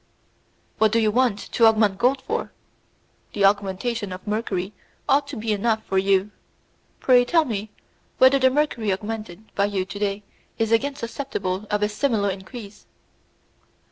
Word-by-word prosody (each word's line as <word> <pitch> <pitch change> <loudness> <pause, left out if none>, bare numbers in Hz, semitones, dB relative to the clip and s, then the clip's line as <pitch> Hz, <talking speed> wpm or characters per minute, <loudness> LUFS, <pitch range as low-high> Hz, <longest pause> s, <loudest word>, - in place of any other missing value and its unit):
"What 220 -1 +4
do 230 - +2
you 220 -2 +3
want 245 -2 +2
to 225 +2 +2
augment 215 -3 +3
gold 260 +2 +2
for? 460 +2 -3 0.8
The 200 -1 +2
augmentation 205 +2 0
of 185 0 -8
mercury 205 -3 -2 0.3
ought 280 +1 +3
to 285 - -7
be 220 0 -2
enough 220 +1 0
for 190 - +1
you. 195 +1 +2 0.7
Pray, 250 -2 +5
tell 325 +5 +2
me 215 -4 -4 0.5
whether 260 +1 +6
the 260 0 +5
mercury 260 -7 0
augmented 215 0 -6
by 200 - +2
you 200 -2 -1
to 200 +1 -8
day 205 0 -2 0.3
is 225 -1 0
again 275 +5 +2
susceptible 215 -6 -4
of 210 0 0
a - - +3
similar 210 -2 0
increase." 200 +2 -10
215 Hz, 155 wpm, -23 LUFS, 200-245 Hz, 0.8 s, whether